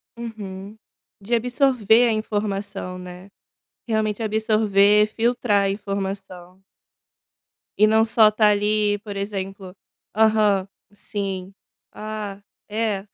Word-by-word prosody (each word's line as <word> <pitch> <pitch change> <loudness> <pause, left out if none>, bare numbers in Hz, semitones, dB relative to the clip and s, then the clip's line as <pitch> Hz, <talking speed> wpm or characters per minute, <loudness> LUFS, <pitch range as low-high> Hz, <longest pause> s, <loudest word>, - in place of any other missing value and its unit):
Uhum. 210 -3 -8 0.4
De 235 +4 0
absorver 245 -1 +3
a - - +1
informação, 205 -3 -3
né. 180 +1 -10 0.6
Realmente 220 0 -1
absorver, 210 -1 +3
filtrar 225 -2 +1
a 195 - +1
informação. 195 -2 -6 1.2
E 215 - +7
não 220 +1 +4
só 220 -1 +5
estar 215 0 +3
ali, 210 0 +1
por 205 -1 -8
exemplo: 195 -1 -5 0.4
"Aham, 215 -3 +3 0.2
sim, 195 -2 -5 0.4
ah, 210 -2 -6 0.3
é". 210 -2 -2
210 Hz, 100 wpm, -22 LUFS, 195-220 Hz, 1.2 s, E